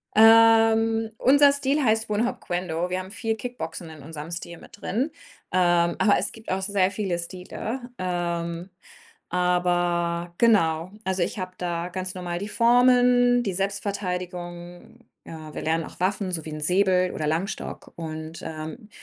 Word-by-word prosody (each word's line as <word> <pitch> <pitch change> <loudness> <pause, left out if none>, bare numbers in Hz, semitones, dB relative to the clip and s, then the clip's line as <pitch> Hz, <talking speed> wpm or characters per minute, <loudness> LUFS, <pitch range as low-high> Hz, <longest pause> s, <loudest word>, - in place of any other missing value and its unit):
Ähm, 225 0 +6
unser 285 +2 +6
Stil 280 +1 0
heißt 220 -2 +1
Wun 210 +2 +1
Hop - - -5
Kuen 180 +1 -3
Do. 170 +2 -2
Wir 185 +1 -1
haben 185 +1 -8
viel 225 +1 -2
Kickboxen 170 -9 -6
in 155 -3 -12
unserem 155 +1 -8
Stil 170 0 -6
mit 205 - -15
drin, 255 - -1 0.4
ähm, 175 -1 +3
aber 205 -2 +4
es - - -1
gibt 225 -1 -9
auch 190 +1 0
sehr 195 -1 +1
viele 195 -4 -2
Stile, 185 +8 -5 0.2
ähm, 175 -1 -3 0.6
aber 175 -1 0
genau. 175 -7 +3
Also, 190 -1 -1
ich 195 - -4
habe 185 0 -5
da 175 -1 -3
ganz 185 0 -4
normal 175 -1 -4
die 200 +2 -5
Formen, 245 +1 +4
die 195 -4 -2
Selbstverteidigung. 180 -1 -4 0.3
Ja, 155 -2 -9
wir - - -5
lernen 160 +1 0
auch - - -11
Waffen, 190 +1 0
so 160 -3 -3
wie - - -6
'n 155 - -5
Säbel 185 +2 +3
oder 155 - -3
Langstock 165 +7 -3
und, 160 0 -7
ähm, 160 +8 -7
185 Hz, 160 wpm, -25 LUFS, 170-220 Hz, 0.6 s, Ähm